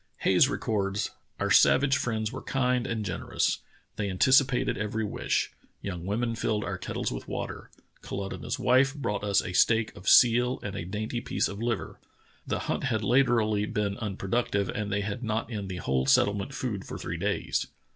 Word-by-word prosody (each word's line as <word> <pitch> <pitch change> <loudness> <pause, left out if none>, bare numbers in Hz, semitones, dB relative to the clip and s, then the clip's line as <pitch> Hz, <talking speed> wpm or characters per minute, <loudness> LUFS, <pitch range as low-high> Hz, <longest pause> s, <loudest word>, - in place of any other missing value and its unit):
Hayes 95 +8 +4
records: 100 -6 -1 0.3
*'Our - - 0
savage 135 0 +5
friends 110 -5 -1
were 130 - -6
kind 125 -2 0
and 110 -2 -2
generous. - - -1 0.4
They 100 -2 -1
anticipated 130 +6 +3
every 110 +1 -2
wish. 105 - -1 0.3
Young 90 -3 -5
women 115 +3 0
filled 110 -2 -1
our - - -4
kettles - - -3
with - - -6
water. - - -5 0.3
Kalutunah's 100 0 -4
wife 130 +2 +3
brought 105 -8 -2
us 100 -1 +2
a 90 - -5
steak 110 +4 +3
of 90 - -2
seal 125 +1 +5
and 100 -1 -4
a 85 - -4
dainty 110 +5 -3
piece - - 0
of 100 +2 -7
liver. 115 -4 -2 0.5
The - - -1
hunt - - -2
had 115 -5 0
latterl}^ 110 -3 +2
been 100 -1 0
unproductive, 100 -1 -1
and 105 -1 -3
they 100 +1 0
had 105 +4 -4
not 110 +1 -2
in 105 -3 -4
the 95 -1 -5
whole 65 -5 0
settlement 100 - +3
food 105 -7 -3
for - - -7
three - - -4
days. - - -1
110 Hz, 175 wpm, -28 LUFS, 100-120 Hz, 0.5 s, savage